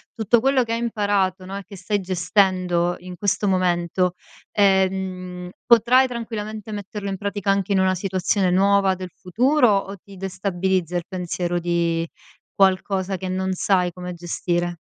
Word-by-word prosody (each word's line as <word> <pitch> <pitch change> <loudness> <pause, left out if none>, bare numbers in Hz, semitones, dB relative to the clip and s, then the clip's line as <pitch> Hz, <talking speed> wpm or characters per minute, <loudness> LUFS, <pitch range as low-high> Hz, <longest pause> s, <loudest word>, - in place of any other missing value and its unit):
tutto 225 +1 +3
quello 265 +1 +3
che 230 -1 -3
hai 230 - -1
imparato, 205 -5 0
no, 190 +1 -6
e 200 - -7
che 195 - -11
stai 200 +3 -1
gestendo 180 -1 +1
in 180 0 -9
questo 205 +1 0
momento, 180 -1 +1 0.4
ehm, 190 -2 0
potrai 240 +3 +5
tranquillamente 220 -3 -6
metterlo 205 0 -5
in 195 - -3
pratica 200 0 -1
anche 195 0 0
in 190 - +3
una 190 0 +2
situazione 185 0 0
nuova 195 +1 +3
del 185 0 -7
futuro, 250 - +2
o 195 0 -5
ti 195 +2 -15
destabilizza 185 -2 -1
il 175 - -4
pensiero 175 -1 -2
di 170 -1 0 0.5
qualcosa 190 0 +1
che 185 - -5
non 190 0 -1
sai 180 -1 +1
come 180 0 -7
gestire? 175 0 -2
190 Hz, 155 wpm, -22 LUFS, 180-205 Hz, 0.5 s, potrai